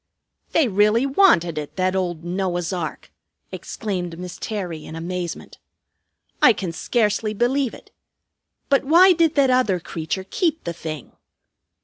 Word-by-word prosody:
"They 320 Hz, -5 st, +3 dB
really 210 Hz, +4 st, +3 dB
wanted 265 Hz, -, +3 dB
it, 150 Hz, -, -8 dB
that 185 Hz, 0 st, 0 dB
old 175 Hz, -3 st, -2 dB
Noah's 175 Hz, 0 st, -2 dB
ark!" 170 Hz, -4 st, -5 dB, 0.4 s
exclaimed 180 Hz, -6 st, -5 dB
Miss 180 Hz, 0 st, -7 dB
Terry 180 Hz, -8 st, -4 dB
in 160 Hz, -, -9 dB
amazement. 175 Hz, +1 st, -5 dB, 0.8 s
"I 245 Hz, -, +7 dB
can 190 Hz, -4 st, -4 dB
scarcely 215 Hz, +3 st, 0 dB
believe 250 Hz, +3 st, 0 dB
it. -, -, -17 dB, 0.8 s
But 275 Hz, -1 st, +3 dB
why 350 Hz, +6 st, +6 dB
did 330 Hz, -2 st, +2 dB
that 275 Hz, -3 st, +4 dB
other 250 Hz, -8 st, +2 dB
creature 165 Hz, +3 st, -4 dB
keep 325 Hz, -, -1 dB
the 170 Hz, -, -4 dB
thing? 160 Hz, -2 st, -7 dB
190 Hz, 135 wpm, -22 LUFS, 175-255 Hz, 0.8 s, I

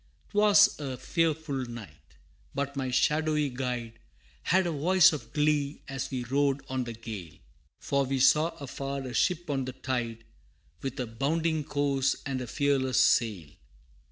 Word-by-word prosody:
'Twas 205 Hz, -2 st, +5 dB
a 135 Hz, -3 st, -4 dB
fearful 160 Hz, -5 st, -1 dB
night, 115 Hz, -3 st, -11 dB, 0.4 s
but 140 Hz, 0 st, -2 dB
my 135 Hz, -2 st, -2 dB
shadowy 150 Hz, +2 st, +1 dB
guide 125 Hz, -3 st, -4 dB, 0.4 s
Had 185 Hz, +1 st, +2 dB
a 170 Hz, -, 0 dB
voice 165 Hz, +3 st, +5 dB
of 130 Hz, -7 st, -7 dB
glee 150 Hz, -1 st, 0 dB
as 135 Hz, -1 st, -4 dB
we 130 Hz, -2 st, -3 dB
rode 140 Hz, +2 st, 0 dB
on 130 Hz, -1 st, -2 dB
the 120 Hz, -, -5 dB
gale, 110 Hz, -8 st, -8 dB, 0.4 s
For 140 Hz, 0 st, 0 dB
we 135 Hz, +1 st, -1 dB
saw 150 Hz, +5 st, +5 dB
afar 140 Hz, 0 st, -5 dB
a 130 Hz, -2 st, -6 dB
ship 175 Hz, +5 st, +1 dB
on 135 Hz, -3 st, -1 dB
the 130 Hz, -, -5 dB
tide, 120 Hz, -3 st, -3 dB, 0.6 s
With 135 Hz, -1 st, -5 dB
a 125 Hz, -, -1 dB
bounding 155 Hz, +7 st, -1 dB
course 140 Hz, -2 st, 0 dB
and 135 Hz, -2 st, -2 dB
a 125 Hz, -, -5 dB
fearless 130 Hz, 0 st, +1 dB
sail. 105 Hz, -, +2 dB
135 Hz, 155 wpm, -28 LUFS, 125-150 Hz, 0.6 s, Twas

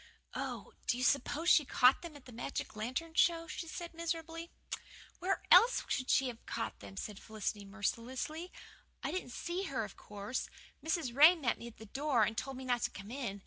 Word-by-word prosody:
"Oh, -, -, -4 dB
do 240 Hz, -, +2 dB
you 250 Hz, -, -1 dB
suppose 285 Hz, +5 st, +2 dB
she 310 Hz, -, +7 dB
caught 255 Hz, -1 st, +5 dB
them 335 Hz, -3 st, -8 dB
at 285 Hz, -, -13 dB
the 255 Hz, -, -11 dB
magic 230 Hz, -1 st, -4 dB
lantern 255 Hz, +10 st, -3 dB
show?" 335 Hz, -1 st, +4 dB
she 330 Hz, +1 st, -5 dB
said 340 Hz, +1 st, -6 dB
miserably. 330 Hz, 0 st, -3 dB, 0.7 s
"Where 375 Hz, +2 st, 0 dB
else -, -, +8 dB
could 255 Hz, -1 st, -2 dB
she 265 Hz, -, +4 dB
have 235 Hz, -2 st, -9 dB
caught 110 Hz, -, -3 dB
them?" 95 Hz, -1 st, -10 dB
said 210 Hz, -2 st, -5 dB
Felicity 215 Hz, -1 st, -4 dB
mercilessly. 245 Hz, -, -3 dB, 0.5 s
"I -, -, -1 dB
didn't 370 Hz, -8 st, -3 dB
see 345 Hz, +9 st, -3 dB
her, 260 Hz, -9 st, -1 dB
of -, -, -12 dB
course 205 Hz, +5 st, -4 dB, 0.3 s
Mrs. 320 Hz, -7 st, -1 dB
Ray 310 Hz, +6 st, +9 dB
met 280 Hz, -8 st, 0 dB
me 235 Hz, -, -7 dB
at 235 Hz, -, -11 dB
the 220 Hz, -, -10 dB
door 270 Hz, +1 st, +2 dB
and 220 Hz, +1 st, +1 dB
told 270 Hz, +3 st, -3 dB
me 260 Hz, -, -6 dB
not 245 Hz, -1 st, +1 dB
to -, -, +1 dB
come 200 Hz, +2 st, -9 dB
in. 240 Hz, -7 st, -3 dB
260 Hz, 200 wpm, -34 LUFS, 225-330 Hz, 0.7 s, Ray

